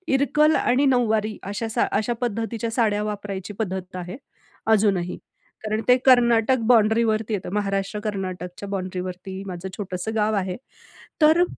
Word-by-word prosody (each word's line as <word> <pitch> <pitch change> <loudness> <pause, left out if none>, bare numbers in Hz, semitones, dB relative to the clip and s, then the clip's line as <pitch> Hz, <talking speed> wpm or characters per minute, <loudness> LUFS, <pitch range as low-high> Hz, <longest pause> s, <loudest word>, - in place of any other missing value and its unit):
इरकल 300 +3 +3
आणि 260 +3 +2
नऊवारी 220 -5 +1
अशा 225 +2 -3
सा 220 - +1
अशा 220 +3 0
पद्धतीच्या 230 0 -2
साड्या 210 -3 +1
वापरायची 205 -1 -5
पद्धत 190 -3 -4
आहे 180 +3 -6 0.5
अजूनही. 195 -5 +2 0.5
कारण 215 0 -1
ते 250 - +7
कर्नाटक 240 -1 +5
बाउंड्रीवरती 220 -1 +3
येतं. 195 -3 -3
महाराष्ट्र-कर्नाटकच्या 195 -2 -3
बाउंड्रीवरती 185 0 -5
माझं 185 0 -6
छोटंसं 195 +2 -4
गाव 215 0 +1
आहे. 185 -2 -2 0.6
तर 315 +3 +6
210 Hz, 125 wpm, -23 LUFS, 190-230 Hz, 0.6 s, ते